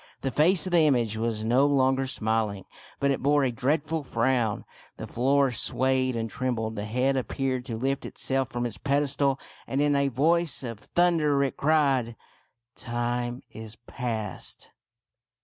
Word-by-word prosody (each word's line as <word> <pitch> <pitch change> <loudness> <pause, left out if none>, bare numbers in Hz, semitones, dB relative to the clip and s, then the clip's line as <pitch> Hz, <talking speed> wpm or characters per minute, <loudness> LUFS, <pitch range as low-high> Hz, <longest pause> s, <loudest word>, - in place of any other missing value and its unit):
The 135 - -2
face 170 +8 +4
of 185 - -3
the 175 - +5
image 125 -8 +2
was 110 -1 -2
no 125 +5 +3
longer 135 -1 +2
smiling, 110 -5 -1 0.3
but 140 0 +2
it 135 - -2
bore 145 +1 +3
a 130 - +1
dreadful 150 +5 -1
frown. 120 -3 0 0.3
The - - -6
floor 135 +2 +2
swayed 130 +1 0
and 115 -1 -2
trembled. 110 -2 -3
The 105 -1 -4
head 125 +5 0
appeared 130 -1 -2
to 115 -4 -4
lift 135 +3 -1
itself 135 -1 0
from 120 0 -3
its 120 - -5
pedestal, 140 -1 +1 0.3
and 135 - -2
in 145 0 +2
a 140 0 +2
voice 155 +3 +1
of 115 -4 -6
thunder 155 -3 +2
it 135 - -2
cried, 140 -6 +1 0.2
— - - -37
" 120 0 -62
Time 120 0 -3
is 110 0 -9
past 115 -5 -5
130 Hz, 165 wpm, -26 LUFS, 115-140 Hz, 0.3 s, the